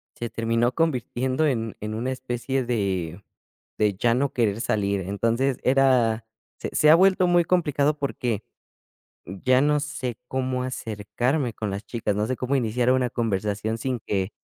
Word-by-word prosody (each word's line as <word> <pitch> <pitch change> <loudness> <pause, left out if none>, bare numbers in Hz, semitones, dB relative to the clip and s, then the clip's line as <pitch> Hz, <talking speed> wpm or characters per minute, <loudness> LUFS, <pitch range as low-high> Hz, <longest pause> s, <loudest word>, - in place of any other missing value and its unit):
se 120 - -4
terminó 115 +2 0
convirtiendo 130 -2 0
en 115 -5 -1
en 105 +1 -4
una 120 +4 -2
especie 130 0 -2
de 100 -6 -2 0.5
de 105 -1 +2
ya 115 +4 +2
no 140 +2 0
querer 110 -3 +1
salir. 100 -4 0
Entonces, 115 +8 0
era 125 -4 +3 0.3
se - - -4
se 150 - +5
ha 155 - +9
vuelto 185 0 +4
muy 175 0 +4
complicado, 150 -4 +1
porque 125 -6 -2 0.8
ya 125 +9 +2
no 150 +1 +3
sé 145 -6 -4
cómo 130 -1 -1
acercarme 120 +2 -2
con 110 - -4
las 100 +3 -5
chicas, 115 -4 -2
no 105 +2 0
sé 130 - -1
cómo 130 +2 -1
iniciar 125 0 +1
una 130 -1 +2
conversación 105 -1 -1
sin 125 0 -2
que 100 0 -2
120 Hz, 160 wpm, -25 LUFS, 110-135 Hz, 0.8 s, ha